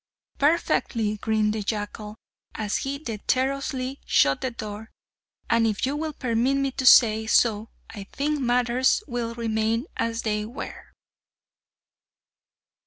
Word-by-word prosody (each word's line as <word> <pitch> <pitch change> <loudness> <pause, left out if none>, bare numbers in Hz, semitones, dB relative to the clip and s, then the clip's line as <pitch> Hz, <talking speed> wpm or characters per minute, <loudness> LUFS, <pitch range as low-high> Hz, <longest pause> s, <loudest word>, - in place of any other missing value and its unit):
"Perfectly!" 240 -8 +1
grinned 215 0 0
the 220 - -3
jackal, 210 0 -4 0.4
as 210 -2 -1
he 275 +1 -3
dexterously 265 +2 -2
shut 135 0 +3
the 260 - -1
door, 215 -2 -8 0.6
"and 230 -1 +3
if 215 +2 -1
you 275 +2 -1
will 310 +1 -3
permit 250 +1 0
me 275 -1 0
to 260 0 -1
say 220 -3 +6
so, 220 -1 +2 0.2
I 205 -3 -8
think 295 +7 -2
matters 250 - +2
will 235 -3 -4
remain 225 +1 -1
as 230 0 -2
they 210 -1 -1
were!" 235 +6 -9
230 Hz, 125 wpm, -25 LUFS, 215-260 Hz, 0.6 s, say